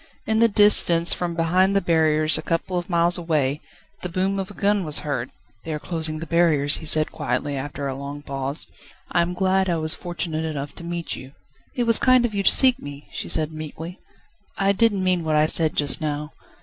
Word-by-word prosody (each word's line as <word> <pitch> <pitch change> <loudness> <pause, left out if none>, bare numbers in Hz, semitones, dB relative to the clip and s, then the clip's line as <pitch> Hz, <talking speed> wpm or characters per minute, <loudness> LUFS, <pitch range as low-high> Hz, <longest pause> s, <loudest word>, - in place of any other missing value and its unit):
In 220 0 0
the 230 - +5
distance, 200 -5 +4
from 175 -1 -3
behind 180 +4 +1
the - - +4
barriers, 160 -3 +2
a - - -1
couple 165 +2 -3
of 175 +1 -3
miles 175 0 +1
away, 150 -4 -1 0.4
the 180 - -5
boom 190 +3 -1
of 190 - -5
a 205 - -12
gun 205 -1 +1
was 150 -3 +3
heard. 135 -5 -3 0.3
"They 165 - -6
are - - -5
closing 160 -1 -2
the 165 - -6
barriers," 155 -3 +2
he 160 - -9
said 155 0 +2
quietly 135 +4 -3
after 140 +1 -5
a 135 - -3
long 140 +2 -8
pause. 135 +1 -5 0.4
"I 170 - +2
am 175 +1 -2
glad 190 0 +1
I 170 - 0
was 155 0 +4
fortunate 170 -3 -5
enough 145 -3 -5
to - - -10
meet 170 0 -5
you." 130 +1 -12 0.4
"It 245 - 0
was 230 -1 +5
kind 255 -2 +4
of 230 - -3
you 200 - -1
to - - +4
seek 260 -2 +5
for - - -20
me," 145 0 -10
she - - -6
said 155 0 0
meekly. 155 +3 -8 0.6
"I 195 0 +2
didn't 200 -2 +1
mean 180 -2 +1
what 155 -1 -1
I 150 0 +4
said 160 0 +3
just 145 0 0
now 150 0 -4
165 Hz, 220 wpm, -22 LUFS, 150-185 Hz, 0.6 s, the